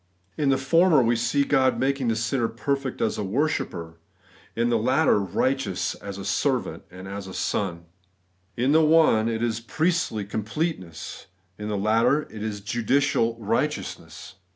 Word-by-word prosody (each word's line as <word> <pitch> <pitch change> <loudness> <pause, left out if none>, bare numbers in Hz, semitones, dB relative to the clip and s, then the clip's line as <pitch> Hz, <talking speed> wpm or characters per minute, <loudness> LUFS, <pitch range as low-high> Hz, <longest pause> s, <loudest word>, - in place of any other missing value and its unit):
In 145 -2 +1
the 135 - +3
former 155 +2 +4
we 120 +1 +2
see 120 +5 +1
God 135 -2 +2
making 135 -1 0
the 115 - +1
sinner 115 +2 0
^perfect 135 +3 -3
as 110 - 0
a - - -1
worshipper; 95 - -2 0.6
in 115 +1 +1
the 120 - +3
latter, 130 +2 +3
righteous 100 +1 -1
as 100 -1 -8
a 100 - -7
servant - - 0
and 95 +1 -10
a 100 +1 -5
son. 85 -3 -2 0.7
In 130 +4 +2
the 160 +2 +5
one 155 -8 +4
it 115 0 -2
is 115 -1 0
priestly 155 - -1
completeness; 105 - -4 0.3
in 105 - -4
the 105 -1 -2
latter 115 +8 +2
it 110 - -8
is 105 -2 -4
judicial 120 +2 +1
righteousness. 105 - -3
115 Hz, 150 wpm, -25 LUFS, 105-140 Hz, 0.7 s, the